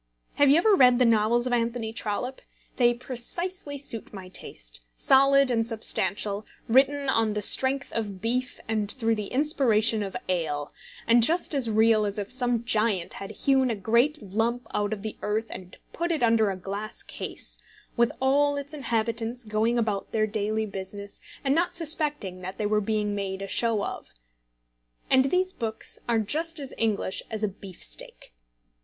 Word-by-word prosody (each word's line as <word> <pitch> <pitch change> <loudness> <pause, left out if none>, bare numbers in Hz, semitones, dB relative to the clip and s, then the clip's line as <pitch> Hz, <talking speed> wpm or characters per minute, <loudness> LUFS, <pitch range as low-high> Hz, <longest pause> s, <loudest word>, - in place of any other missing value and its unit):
Have 285 -1 +5
you 285 - +6
ever 415 +5 +4
read 250 -8 +6
the 250 - +4
novels 230 +1 +3
of 250 - 0
Anthony 230 -1 -1
Trollope? 235 +4 -3 0.4
They 240 -2 +5
precisely 285 +6 -3
suit 235 -5 -4
my 190 -3 -9
taste, - - -5
solid 275 - +5
and 225 -1 +2
substantial, 215 -2 -1 0.2
written 275 +4 +3
on 225 -4 +2
the 210 - -1
strength 265 +5 +3
of 205 -4 -3
beef 250 +4 -2
and 215 -2 -1
through 230 -3 0
the 210 -2 -3
inspiration 235 -6 +2
of 195 -2 -4
ale, 155 -5 -2 0.3
and 235 +1 +5
just 325 +7 +3
as 265 -5 +1
real 220 -1 +4
as 200 - -3
if 205 +2 -4
some 245 -2 0
giant 215 -6 +1
had 195 0 -7
hewn 265 +4 +2
a 230 - 0
great 235 +9 +2
lump 225 +5 -1
out 205 0 0
of 205 -2 -4
the 220 - -5
earth 215 +2 -1
and 180 -1 -9 0.2
put 345 +1 -1
it 315 -6 0
under 225 -2 +4
a 195 - -2
glass 200 +3 -4
case, - - -6 0.4
with 235 -1 +3
all 285 +2 +3
its 285 +1 -5
inhabitants 235 -3 -2
going 220 +2 0
about 215 -4 -1
their 215 -1 +2
daily 215 +1 -1
business, 200 0 -7 0.2
and 270 -1 +2
not 345 +3 +1
suspecting 295 - 0
that 185 +1 -6
they 215 - -2
were 210 0 +2
being 210 0 -1
made 195 -1 -3
a - - -5
show 225 0 +1
of. - - -5 1.0
And 260 0 +5
these 370 +6 +1
books 220 -2 -4
are 235 - +3
just 315 +9 -2
as 275 -2 -6
English 215 -4 0
as 220 -1 -4
a - - +3
beef 195 -2 -11
steak. - - -7
225 Hz, 175 wpm, -26 LUFS, 210-265 Hz, 1.0 s, you